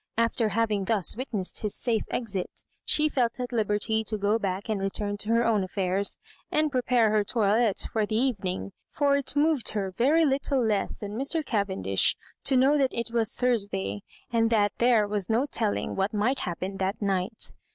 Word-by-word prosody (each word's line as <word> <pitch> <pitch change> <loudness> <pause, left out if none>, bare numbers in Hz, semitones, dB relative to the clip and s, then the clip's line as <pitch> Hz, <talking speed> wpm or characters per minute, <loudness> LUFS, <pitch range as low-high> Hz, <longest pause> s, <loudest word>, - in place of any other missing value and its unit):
After 230 -1 +1
having 210 -2 0
thus 205 -4 +1
witnessed 215 -6 -3
his 210 -2 -2
safe 230 -3 0
exit, 200 -6 -4 0.2
she 305 0 +4
felt 250 -5 0
at 250 -1 -3
hberty 220 -1 +1
to 215 - 0
go 205 +2 +1
back 195 0 -3
and 215 -3 -1
return 205 +1 -1
to 210 - -2
her 230 +1 +3
own 215 -4 +2
affairs, 190 +1 -1 0.3
and 305 -1 +1
prepare 245 -4 +2
her 215 -1 +3
toilette 215 0 +2
lor 215 -2 +1
the 215 - -2
evening; 200 -7 -1 0.2
for 285 -1 +2
it 280 0 -1
moved 295 -3 +2
her 195 -3 -2
very 285 - +3
little 270 -2 +1
less 210 -3 -1
than 205 -1 -6
Mr. 275 +8 -1
Cavendish 190 - +1 0.3
to 270 - +3
know 275 +3 +4
that 270 -2 +1
it 235 0 -3
was 225 -3 0
Thursday, 200 - -1 0.3
and 225 -1 +2
that 205 -3 +2
there 235 -3 +4
was 205 -3 -3
no 230 +5 +2
telling 225 -7 -2
what 195 +3 -1
might 235 +6 +1
happen 185 +2 -4
that 195 +3 -2
night. 200 +2 -2
220 Hz, 185 wpm, -27 LUFS, 200-245 Hz, 0.3 s, she